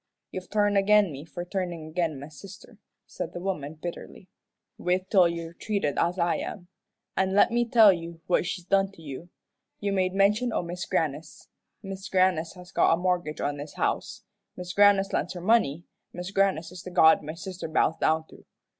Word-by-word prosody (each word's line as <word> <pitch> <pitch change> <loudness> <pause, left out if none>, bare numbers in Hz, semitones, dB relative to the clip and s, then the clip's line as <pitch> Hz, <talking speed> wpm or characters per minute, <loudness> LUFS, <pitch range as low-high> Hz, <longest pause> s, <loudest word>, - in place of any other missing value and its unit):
"You've 185 -1 -7
turned 205 -1 +2
agin 205 -2 +4
me 140 +2 -8
for 175 +1 -7
turnin' 175 -4 -4
agin 160 -3 -1
my 140 - -8
sister," 195 - -13 0.3
said 170 - -6
the - - -5
woman, 160 -5 -4
bitterly. 175 +2 -8 0.5
"Wait 185 +1 -1
till 185 -4 +6
you're 170 0 -5
treated 200 -6 -2
as 175 +2 +1
I 170 -1 +1
am. 180 -3 -7 0.5
An' 190 0 +1
let 205 - +5
me 240 0 +2
tell 220 -4 +7
you 170 -1 -7
what 180 -1 +1
she's 180 -2 -4
done 195 +1 +2
to 165 - -16
you. 150 +4 -8 0.5
You 200 -1 -1
made 185 -1 0
mention 210 +5 +3
o' - - 0
Mis' 175 +1 -5
Grannis. 155 -1 -3 0.3
Mis' 195 0 -7
Grannis 185 -3 +2
has 180 0 -13
got - - +4
a - - -7
mortgage 175 -3 -1
on 145 0 -1
this 145 +1 -8
house. - - -2 0.3
Mis' 180 0 -6
Grannis 200 -1 +4
lends 180 - -1
her 180 - -7
money, 175 -6 +2 0.3
Mis' 180 +2 -6
Grannis 195 -5 +1
is 180 -1 -9
the 185 - -8
god 160 -3 +5
my 155 +2 -7
sister 180 +1 -6
bows 160 0 +2
down 160 0 +1
to. - - -16
180 Hz, 190 wpm, -27 LUFS, 165-195 Hz, 0.5 s, tell